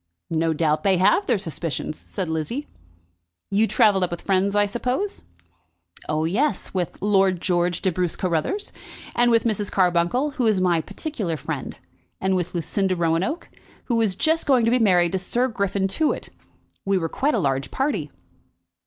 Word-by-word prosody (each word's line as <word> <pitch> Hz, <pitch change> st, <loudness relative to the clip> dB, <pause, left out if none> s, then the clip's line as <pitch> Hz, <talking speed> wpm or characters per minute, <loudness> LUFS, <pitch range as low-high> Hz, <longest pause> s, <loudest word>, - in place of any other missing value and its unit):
"No 165 Hz, 0 st, +1 dB
doubt 155 Hz, -1 st, +1 dB
they 195 Hz, -2 st, +3 dB
have 290 Hz, -, +3 dB
their -, -, +3 dB
suspicions," 165 Hz, -3 st, -3 dB
said 190 Hz, +2 st, -5 dB
Lizzie. 160 Hz, -, -3 dB, 0.9 s
"You 210 Hz, +3 st, +3 dB
travelled 200 Hz, -4 st, +3 dB
up 180 Hz, -, 0 dB
with 175 Hz, -, -6 dB
friends, 195 Hz, +1 st, +1 dB
I 205 Hz, 0 st, +4 dB
suppose." 250 Hz, -, -3 dB, 0.8 s
"Oh 155 Hz, +1 st, 0 dB
yes, 210 Hz, -, 0 dB
with 180 Hz, -3 st, -3 dB
Lord 195 Hz, -3 st, +3 dB
George 175 Hz, -1 st, 0 dB
de 190 Hz, -, +2 dB
Bruce 180 Hz, 0 st, -1 dB
Carruthers; 185 Hz, -, -1 dB, 0.4 s
and 240 Hz, 0 st, +4 dB
with 230 Hz, -1 st, +4 dB
Mrs. 210 Hz, -3 st, -1 dB
Carbuncle, 180 Hz, -, +2 dB
who 260 Hz, -5 st, 0 dB
is 210 Hz, -3 st, +3 dB
my 175 Hz, -3 st, +2 dB
particular 200 Hz, -, -4 dB
friend, -, -, -5 dB, 0.4 s
and 190 Hz, 0 st, +1 dB
with 180 Hz, 0 st, -2 dB
Lucinda 185 Hz, +3 st, 0 dB
Roanoke, 170 Hz, -, 0 dB, 0.4 s
who 230 Hz, -2 st, 0 dB
is 205 Hz, -4 st, +1 dB
just 320 Hz, -, +1 dB
going 255 Hz, -5 st, +4 dB
to 230 Hz, -, +3 dB
be 250 Hz, -, +3 dB
married 180 Hz, -6 st, +4 dB
to 190 Hz, -, 0 dB
Sir 240 Hz, +7 st, 0 dB
Griffin 200 Hz, -4 st, -1 dB
Tewett. 305 Hz, +11 st, -1 dB, 0.5 s
We 195 Hz, 0 st, +1 dB
were 165 Hz, -3 st, -1 dB
quite 285 Hz, -, 0 dB
a -, -, +2 dB
large 135 Hz, -1 st, 0 dB
party." 275 Hz, +2 st, -1 dB
190 Hz, 170 wpm, -23 LUFS, 175-230 Hz, 0.9 s, I